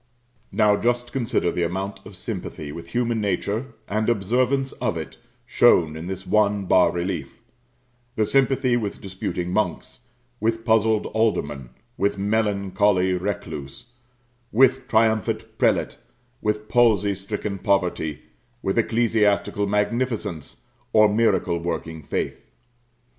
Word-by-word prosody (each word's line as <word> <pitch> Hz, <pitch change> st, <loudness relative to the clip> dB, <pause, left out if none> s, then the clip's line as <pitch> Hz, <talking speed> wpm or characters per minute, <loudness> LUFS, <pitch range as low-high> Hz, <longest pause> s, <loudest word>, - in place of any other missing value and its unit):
Now 105 Hz, -2 st, +3 dB
just 120 Hz, +1 st, 0 dB
consider 120 Hz, -9 st, 0 dB
the -, -, -2 dB
amount 95 Hz, +3 st, -2 dB
of 95 Hz, -, -11 dB
sympathy 75 Hz, -4 st, -6 dB
with 85 Hz, +2 st, -8 dB
human 120 Hz, +3 st, -1 dB
nature, 105 Hz, +5 st, -2 dB
and 110 Hz, +2 st, 0 dB
observance 125 Hz, +5 st, +1 dB
of 110 Hz, -8 st, -2 dB
it, 80 Hz, -, -7 dB, 0.3 s
shown 90 Hz, -11 st, +4 dB
in 80 Hz, +2 st, -6 dB
this 95 Hz, 0 st, -5 dB
one 105 Hz, -2 st, +2 dB
bas 90 Hz, 0 st, +4 dB
relief; 85 Hz, -4 st, -4 dB, 0.8 s
the 110 Hz, -, +2 dB
sympathy 135 Hz, 0 st, +2 dB
with 110 Hz, -4 st, -3 dB
disputing 90 Hz, -2 st, -4 dB
monks, 105 Hz, +3 st, -2 dB, 0.4 s
with 115 Hz, +1 st, -1 dB
puzzled 110 Hz, -1 st, +3 dB
aldermen, 75 Hz, -, 0 dB, 0.3 s
with 100 Hz, +1 st, 0 dB
melancholy 100 Hz, -2 st, +1 dB
recluse, 90 Hz, -, -5 dB, 0.6 s
with 130 Hz, +2 st, +4 dB
triumphant 110 Hz, -2 st, +1 dB
prelate, -, -, +1 dB, 0.4 s
with 105 Hz, 0 st, -1 dB
palsy 110 Hz, -5 st, +3 dB
stricken 100 Hz, +1 st, -5 dB
poverty, 90 Hz, -7 st, 0 dB, 0.4 s
with 95 Hz, +4 st, +1 dB
ecclesiastical 110 Hz, -3 st, +1 dB
magnificence, 105 Hz, -, -2 dB, 0.3 s
or 110 Hz, -1 st, +5 dB
miracle 100 Hz, -6 st, +2 dB
working 80 Hz, -1 st, -4 dB
faith. 70 Hz, -, -3 dB
105 Hz, 115 wpm, -23 LUFS, 90-115 Hz, 0.8 s, or